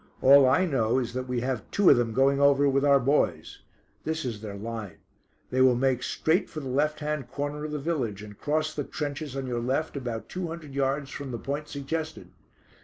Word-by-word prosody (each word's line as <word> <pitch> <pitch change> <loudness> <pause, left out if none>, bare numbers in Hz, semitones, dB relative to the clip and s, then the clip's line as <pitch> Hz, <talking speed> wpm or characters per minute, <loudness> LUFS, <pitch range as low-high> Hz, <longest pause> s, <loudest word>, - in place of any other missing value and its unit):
"All 135 0 +7
I 160 +8 +3
know 125 -7 +1
is 120 -2 -2
that 130 0 -4
we 125 -1 -1
have 125 -4 -3
two 200 -2 +5
of - - +7
them 120 -2 0
going 135 +4 +3
over 140 0 +5
with 135 0 +2
our 140 -1 +5
boys. 140 +4 0 0.4
This 160 -2 -2
is 115 -4 -4
their 105 -2 -6
line; 110 -2 -6 0.5
they 130 - +2
will 130 -1 +6
make 130 0 +1
straight 165 +9 0
for 155 - -6
the 140 - -6
left 150 +4 0
hand 150 -3 -3
corner 145 +1 -4
of 155 - -5
the 150 - -2
village, 135 -10 -2
and 105 -1 -10
cross 155 +5 -1
the 145 - -2
trenches 145 -1 -5
on 135 -1 -3
your 120 -2 -2
left 135 +7 -1
about 120 -5 -4
two 180 -1 -4
hundred 160 -4 -8
yards 140 0 -1
from 140 -2 -6
the 120 - -4
point 145 +5 -4
suggested. 155 +3 -5
140 Hz, 215 wpm, -27 LUFS, 125-150 Hz, 0.5 s, All